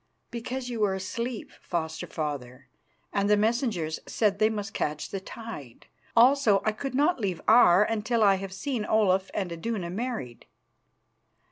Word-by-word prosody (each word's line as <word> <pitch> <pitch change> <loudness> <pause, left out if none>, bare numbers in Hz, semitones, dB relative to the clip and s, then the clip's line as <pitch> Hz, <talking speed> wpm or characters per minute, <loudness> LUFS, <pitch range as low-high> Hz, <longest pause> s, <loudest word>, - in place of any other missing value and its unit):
"Because 245 +2 -4
you 240 -2 -4
were 200 -3 +2
asleep, 230 +5 -4
Foster 160 -2 -3
father, 140 -4 -5 0.4
and 200 0 +1
the 210 - +5
messengers 215 - 0
said 205 -3 +1
they 215 0 +4
must 205 -2 -4
catch 150 0 -3
the 195 - -3
tide. 190 - -9 0.3
Also 240 -4 +5
I 215 - +3
could 255 +5 -5
not 295 +3 +2
leave 190 -6 -2
Aar 210 -4 +7
until 225 +1 0
I 200 -1 +6
had 195 0 -6
seen 240 +3 -3
Olaf 195 -3 +2
and 190 -4 -2
Iduna 175 +1 -3
married." 215 - -5
210 Hz, 150 wpm, -27 LUFS, 180-230 Hz, 0.4 s, Aar